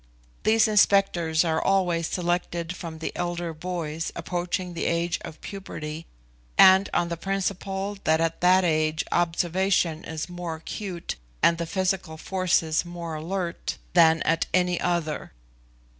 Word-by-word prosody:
These 220 0 +4
inspectors 195 -6 +3
are 160 -1 0
always 175 -4 +2
selected 175 -1 -2
from 165 -3 -7
the 160 - -4
elder 175 -1 -3
boys 165 -1 -4
approaching 175 +1 -3
the 170 - -3
age 170 0 0
of 155 - -9
puberty, 165 -5 -7 0.5
and 190 +1 +7
on 170 0 +1
the 170 - -3
principle 195 +1 -2
that 160 0 +3
at 165 0 -1
that 185 +1 +5
age 155 -1 +1
observation 175 -1 +1
is 160 0 -5
more 175 -2 -5
acute 175 - -6 0.3
and 170 0 +4
the 170 - -2
physical 185 -2 -1
forces 170 -3 +1
more 175 -2 -6
alert 170 +3 -3 0.2
than 165 -2 +5
at 165 0 +1
any 180 -1 +2
other. 170 - -2
175 Hz, 135 wpm, -26 LUFS, 165-185 Hz, 0.5 s, and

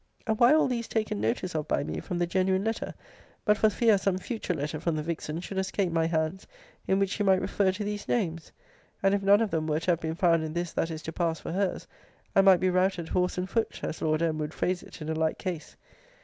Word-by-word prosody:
] - - -35
And 220 -2 0
why 240 +2 +7
all 310 +1 +5
these 235 -3 -2
taken 215 - -1
notice 120 - -1
of 155 -1 -2
by - - +1
me 80 0 -4
from 175 - -4
the 175 - +1
genuine 190 +2 +1
letter, 225 +1 -3 0.5
but 210 - +5
for 215 +1 +4
fear 215 0 +3
some 190 -1 +1
future 190 -2 -3
letter 150 +1 -3
from 165 0 -1
the 155 - -2
vixen 165 0 -4
should 190 +1 -4
escape 190 -1 -1
my 165 0 +2
hands, 160 +3 -1 0.4
in 190 - +3
which 195 -1 +1
she 210 - -2
might 190 -2 +4
refer 190 0 +1
to 195 +3 -4
these 205 0 -4
names? 170 -8 -1 0.5
And, 195 0 +4
if 200 - +1
none 200 +2 +5
of 220 -3 0
them 160 -1 -1
were 155 0 +1
to 180 - +2
have 170 - +1
been 160 -1 -3
found 165 -2 +3
in 155 -1 -4
this 175 0 -3
that 165 - 0
is 160 -1 -6
to 160 - -5
pass 165 -2 -1
for - - -6
her's, 190 +1 -1 0.5
I 195 - +7
might 190 -2 +6
be 185 0 +2
routed 185 -2 +1
horse 180 0 0
and 180 +1 -1
foot, 225 +4 -1
as - - -4
Lord 155 +1 +1
M. 160 -2 0
would 150 0 -4
phrase 180 0 0
it 155 - -10
in 155 - -5
a - - 0
like 160 0 0
case. 175 -5 -5
180 Hz, 260 wpm, -28 LUFS, 160-195 Hz, 0.5 s, why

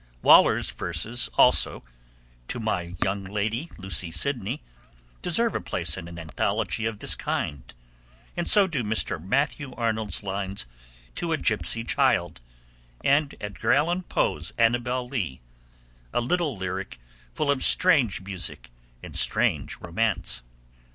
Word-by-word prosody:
Waller's - - +6
verses 105 +9 -1
also, - - +4 0.6
To 125 - -3
My 90 -6 -2
Young 100 +1 -1
Lady 110 - -2
Lucy 95 -2 -1
Sidney, 120 - -2 0.6
deserve 220 +6 +2
a - - -2
place 80 -2 -2
in 85 -3 -7
an 85 0 -9
anthology 100 +6 -1
of 115 -2 -4
this - - +2
kind, 65 -4 -3 0.6
and - - -1
so 205 -2 +7
do 150 -9 -2
Mr. 105 -6 -1
Matthew 140 - -1
Arnold's 110 -5 -1
lines 95 -5 -3 0.5
To - - -2
a - - +1
Gipsy 115 - +1
Child, 115 - +1 0.6
and 140 +1 +2
Edgar 105 -2 0
Allan 175 +4 +2
Poe's 80 - -1
Annabel 120 +2 +1
Lee, 105 - -3 0.7
a - - +1
little 150 - 0
lyric 95 -6 -5 0.4
full 145 -2 +1
of 135 -2 0
strange 145 - +4
music 95 -9 -4 0.3
and - - -9
strange - - +1
romance. 95 - -1
110 Hz, 130 wpm, -26 LUFS, 90-130 Hz, 0.7 s, so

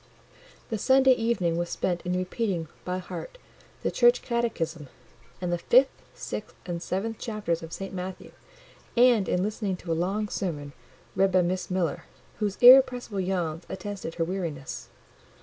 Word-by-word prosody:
The 220 - -1
Sunday 265 +3 +5
evening 225 -9 +1
was 175 0 -2
spent 175 -2 -1
in 180 - 0
repeating, 185 -3 -2
by 180 0 -2
heart, 180 - -7 0.5
the - - 0
Church 240 0 +4
Catechism, 170 - -2 0.5
and 180 -1 -2
the 175 - -1
fifth, 255 +9 +5 0.2
sixth, - - -6
and 175 -1 -4
seventh 205 +6 -3
chapters 210 -7 -2
of 165 0 -9
St. 195 +3 -6
Matthew; 185 0 -6 0.7
and 240 -5 +5
in 180 - +1
listening 205 -2 -2
to 175 -2 -6
a - - +3
long 195 +6 -1
sermon, 150 -8 -4 0.4
read 195 0 +3
by 185 -1 +4
Miss 180 +1 -2
Miller, 180 -4 -1 0.3
whose 205 -2 -1
irrepressible 250 -4 +7
yawns 175 -3 -1
attested 190 -3 -6
her 165 - 0
weariness. 165 -6 -4
185 Hz, 150 wpm, -27 LUFS, 170-220 Hz, 0.7 s, irrepressible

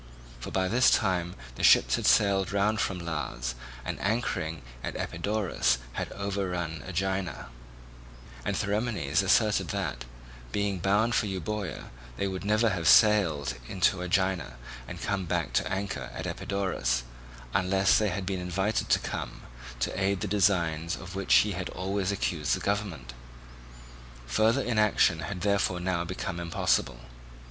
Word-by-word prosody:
For - - -6
by 95 -1 0
this 120 +6 +4
time 90 -4 +1 0.2
the - - -6
ships - - +6
had - - -1
sailed 100 -3 +4
round 105 +2 +1
from 95 - -1
Las, 75 -7 -3 0.3
and - - -4
anchoring 95 - -1 0.2
at - - -4
Epidaurus 100 - 0 0.2
had - - -4
overrun 90 -5 -3
Aegina; 95 -6 -2 0.9
and - - -1
Theramenes 100 - 0
asserted 105 +2 +3
that, - - -3 0.5
being 100 -2 -1
bound 105 +6 +2
for 105 - +2
Euboea, 95 0 -4 0.3
they 100 - 0
would 95 0 -4
never 110 +3 +3
have 85 -4 -1
sailed 85 -11 +5 0.2
in 95 - -6
to 90 0 +3
Aegina 90 -6 0 0.3
and - - -7
come 100 -2 -1
back - - -1
to - - +1
anchor 95 0 -3
at - - -5
Epidaurus, 60 -12 -1 0.5
unless 95 +1 +3
they 105 -1 +1
had 95 +1 -3
been 95 0 -2
invited 95 +4 -1
to - - +5
come - - -5 0.4
to - - 0
aid 95 +1 +1
in 100 - -4
the 105 - -1
designs 85 -5 +1
of 90 -1 -9
which 95 0 -4
he 105 - +5
had 90 -1 -4
always 95 +1 -2
accused 85 -5 0
the - - -5
government. 95 -12 -3 1.1
Further 110 - +2
inaction 105 -7 +3
had 90 +3 -5
therefore 100 -2 +1
now 90 -1 -1
become 90 0 -4
impossible. 85 -7 0
95 Hz, 150 wpm, -28 LUFS, 85-100 Hz, 1.1 s, ships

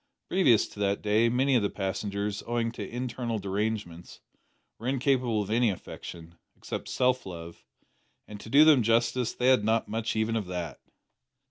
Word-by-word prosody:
Previous 135 - +4
to - - -13
that 100 0 0
day, 110 +2 +3
many 130 +3 +2
of 120 - +4
the 100 - 0
passengers, 100 +1 -3
owing 115 -1 0
to 105 -4 -7
internal 120 -1 -3
derangements, 100 -3 -4 0.6
were 115 - -6
incapable 130 -4 +1
of 100 - -7
any 120 +1 +3
affection, 85 -3 -8 0.2
except - - -6
self 130 0 +1
love, 85 -2 -9 0.6
and 105 -1 -9
to 110 - -10
do 145 +5 +7
them 150 -5 +6
justice 115 +2 +1
they 125 +1 +2
had 130 -5 +4
not 110 +1 +1
much 110 +1 -2
even 110 +1 0
of 105 -4 -2
that! 90 -4 -5
110 Hz, 165 wpm, -28 LUFS, 100-125 Hz, 0.6 s, do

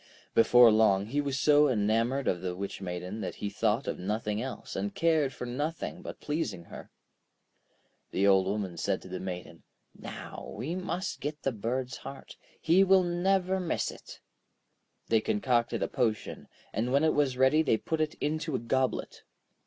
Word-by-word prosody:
Before 120 0 +7
long, 105 -3 +4
he 140 +7 -1
was 140 -1 -2
so 150 0 +5
enamoured 115 +4 +1
of 90 - 0
the 90 -1 -3
Witch 100 +1 -5
Maiden 90 +3 -5
that - - -4
he 100 - -4
thought 110 +5 0
of - - -3
nothing 105 +3 -2
else, 125 -4 -6
and 100 +1 -3
cared 160 -5 +2
for 125 - -6
nothing 150 +8 -3
but - - -8
pleasing 130 - -3
her. - - -11 1.2
The 95 - +1
Old 95 -1 +5
Woman 95 -3 -2
said - - -1
to - - -10
the 90 0 -5
Maiden: 90 -2 -7 0.3
'Now - - -8
we 130 +10 -3
must 185 +1 -3
get 150 +1 -5
the 135 - +1
bird's 125 +3 -3
heart, 135 0 -10 0.2
he 175 +4 +4
will 190 -1 +5
never 185 +2 +1
miss 175 -3 -1
it.' - - -13 0.9
They 110 -1 +4
concocted 120 +3 +1
a - - 0
potion, 110 -3 -2 0.3
and 115 +4 -1
when 140 +3 +3
it 160 - +3
was 140 -4 +1
ready 130 +4 +5
they 130 -8 +2
put 160 +7 -2
it 155 -1 -1
into 155 0 -2
a - - 0
goblet. 130 +3 -1
125 Hz, 175 wpm, -29 LUFS, 105-150 Hz, 1.2 s, Before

